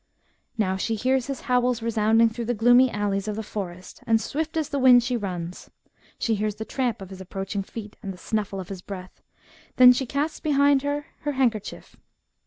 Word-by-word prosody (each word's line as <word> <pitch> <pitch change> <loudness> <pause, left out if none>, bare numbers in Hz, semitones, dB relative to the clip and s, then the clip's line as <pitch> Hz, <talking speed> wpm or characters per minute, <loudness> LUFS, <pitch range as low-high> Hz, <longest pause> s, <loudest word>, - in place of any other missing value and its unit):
Now 190 -3 0
she 225 +4 -1
hears 255 +3 0
his 275 -2 -4
howls 250 -1 +1
resounding 225 0 +3
through 235 +1 -5
the 245 +1 -1
gloomy 245 +4 +5
alleys 205 -2 -2
of 210 - -2
the 220 - -4
forest, 185 -4 -7
and 225 -1 +4
swift 315 +7 -3
as 310 -3 -1
the 285 - -1
wind 250 -2 +7
she 250 0 -1
runs. 180 -5 -5 0.5
She 230 - 0
hears 210 0 -1
the 220 - -6
tramp 240 -6 -2
of 190 - -12
his 190 0 -9
approaching 195 +2 -4
feet, 210 +1 -9
and 195 - -5
the 185 - -10
snuflSe 200 -1 -3
of 180 - -11
his 190 -2 -7
breath. 185 -1 -9 0.5
Then 250 0 +9
she 260 +1 -2
casts 290 +5 -2
behind 285 -2 +3
her 285 +1 -2
her 295 -1 -3
handkerchief. 235 -6 -2
225 Hz, 195 wpm, -25 LUFS, 200-255 Hz, 0.5 s, Then